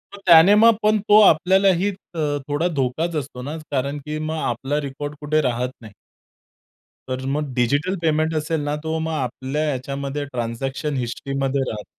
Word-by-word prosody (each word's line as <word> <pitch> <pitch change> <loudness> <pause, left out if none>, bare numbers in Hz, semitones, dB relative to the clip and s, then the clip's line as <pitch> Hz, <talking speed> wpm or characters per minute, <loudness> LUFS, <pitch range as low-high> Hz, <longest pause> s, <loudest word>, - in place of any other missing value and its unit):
मग - - -12
त्याने 170 +4 +8
मग 225 +1 +6
पण 215 0 +3
तो 210 - +8
आपल्यालाही 190 +2 +4
अ, 185 -3 -9 0.3
थोडा 145 +4 0
धोकाच 155 +6 -1
असतो 135 -3 -5
ना, 150 +5 -5
कारण 140 +1 -1
की 150 0 -4
मग 155 +1 -3
आपला 135 +5 -1
रेकॉर्ड 145 +1 -6
कुठे 155 +1 +1
राहत 125 -2 -1
नाही. 110 -2 -12 1.2
तर 130 0 -3
मग 145 -3 -3
डिजिटल 145 +10 +1
पेमेंट 155 0 +1
असेल 155 +1 -1
ना 145 0 -2
तो 160 0 -2
मग 160 0 -2
आपल्या 135 +2 -3
याच्यामध्ये 140 +2 -4
ट्रान्झॅक्शन 135 +3 -3
हिस्ट्रीमध्ये 135 +2 -2
राहतो. 105 -2 -6
145 Hz, 160 wpm, -22 LUFS, 130-160 Hz, 1.2 s, त्याने